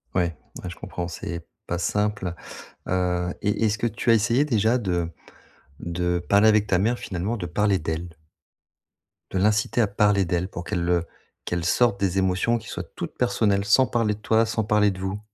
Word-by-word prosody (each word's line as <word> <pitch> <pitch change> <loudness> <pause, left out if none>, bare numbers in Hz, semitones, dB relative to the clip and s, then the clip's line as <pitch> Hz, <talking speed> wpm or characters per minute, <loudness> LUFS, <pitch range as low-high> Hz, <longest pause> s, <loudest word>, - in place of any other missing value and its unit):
Ouais, 85 -3 +1 0.3
ouais 90 - -4
je 90 - -8
comprends, 90 -1 -5
c'est 85 -1 -6 0.2
pas 85 - -1
simple. 100 0 -1 0.5
Heu 90 -1 0
et 105 +2 +1
est-ce 110 0 +1
que 120 - 0
tu 115 +2 -2
as - - +8
essayé 115 +5 +3
déjà 115 -3 +2
de 90 -7 -1 0.7
de 90 +1 -1
parler 100 +5 +4
avec 105 -1 +4
ta 90 - +2
mère 115 +6 +1
finalement, 95 +5 -3
de 90 - -4
parler 100 +3 +1
d'elle? 80 +2 -4 1.2
De - - -1
l'inciter 105 +4 +2
à - - +4
parler 100 -1 +2
d'elle 90 +1 -1
pour 90 - -6
qu'elle, 85 0 -2
heu, 85 -1 +2 0.4
qu'elle 90 -1 -2
sorte 100 +4 +2
des 95 -1 0
émotions 95 +5 +2
qui 115 - -10
soient - - -4
toutes - - -6
personnelles, 105 -5 +1
sans 105 +6 +5
parler 115 -3 0
de - - -16
toi, 110 +1 +3
sans 110 0 -1
parler 105 0 +3
de 95 -1 -5
vous. 95 +2 -3
100 Hz, 190 wpm, -24 LUFS, 90-110 Hz, 1.2 s, as